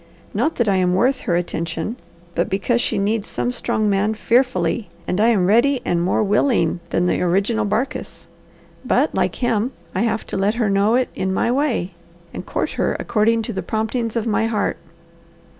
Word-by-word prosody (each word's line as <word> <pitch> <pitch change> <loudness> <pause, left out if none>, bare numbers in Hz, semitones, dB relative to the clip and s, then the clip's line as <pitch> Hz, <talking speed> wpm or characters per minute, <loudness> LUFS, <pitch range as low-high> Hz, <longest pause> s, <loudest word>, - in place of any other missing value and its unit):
Not 320 - 0
that 235 - 0
I 195 -2 +3
am 180 -1 +2
worth 255 +8 +2
her 170 - +3
attention, 170 +3 -2 0.4
but 170 - 0
because 235 +5 +1
she - - 0
needs 205 +2 0
some 245 - -2
strong 215 -3 0
man 205 +2 +1
fearfully, 240 0 +1 0.2
and 180 - 0
I 225 - +5
am 210 -6 +3
ready 240 +7 +3
and 170 -1 +1
more 185 +4 +1
'willing' 205 - +2
than 175 - +1
the - - +1
original 200 +5 +1
Barkis. 225 +6 -3 0.6
But, - - +1
like - - 0
him, 240 0 0 0.2
I - - -1
have 225 -1 0
to - - -4
let 200 +3 +1
her 225 -4 +1
know 200 +4 +3
it 255 0 +1
in 190 0 -2
my 210 +5 +1
way, 250 -9 0 0.4
and - - -6
court - - -2
her - - +1
according 225 +1 +1
to 230 - -4
the 190 - -3
promptings 220 +4 -2
of 230 -1 -1
my 225 0 +1
heart." 215 -3 -1
215 Hz, 190 wpm, -21 LUFS, 195-235 Hz, 0.6 s, I